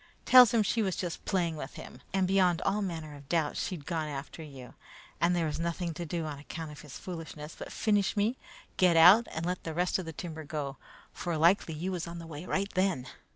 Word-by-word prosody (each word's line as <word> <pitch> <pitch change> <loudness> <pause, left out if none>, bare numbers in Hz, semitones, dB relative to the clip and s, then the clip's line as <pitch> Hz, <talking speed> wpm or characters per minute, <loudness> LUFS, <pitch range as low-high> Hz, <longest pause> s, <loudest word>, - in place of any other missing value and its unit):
Tells 250 -2 +9
him 230 -3 +3
she 225 +2 +1
was 190 -4 0
just 175 -2 -4
playing 170 -5 0
with 135 -2 -7
him, 125 - -10
and 190 -1 +1
beyond 185 -3 +3
all 205 +2 +1
manner 165 -6 -4
of 140 -1 -14
doubt 160 -4 +1
she'd 180 -10 -4
gone 160 -3 -2
after 145 +2 -6
you, 135 -5 -10 0.5
and 175 +1 +3
there 170 -2 +1
was 155 0 -3
nothing 170 0 -2
to 170 +2 -6
do 165 +1 -2
on 145 -2 -5
account 160 +1 -7
of 150 - -11
his 145 -3 -10
foolishness 165 -3 -7
but - - -8
finish 205 -1 +1
me, 215 +5 +2 0.4
get 180 -3 +5
out, 190 +8 +8
and 160 +1 -3
let 180 +1 -2
the 160 -1 -5
rest 180 +2 +1
of 185 - -5
the 160 - -5
timber 160 -1 -6
go, 145 -3 -4 0.4
for 170 -3 -3
likely 170 0 +3
you 175 +5 -3
was 175 -2 -3
on 170 0 -7
the 165 - -8
way 160 +2 -8
right 200 +1 -1
then. 185 -9 +1
170 Hz, 230 wpm, -30 LUFS, 155-185 Hz, 0.5 s, Tells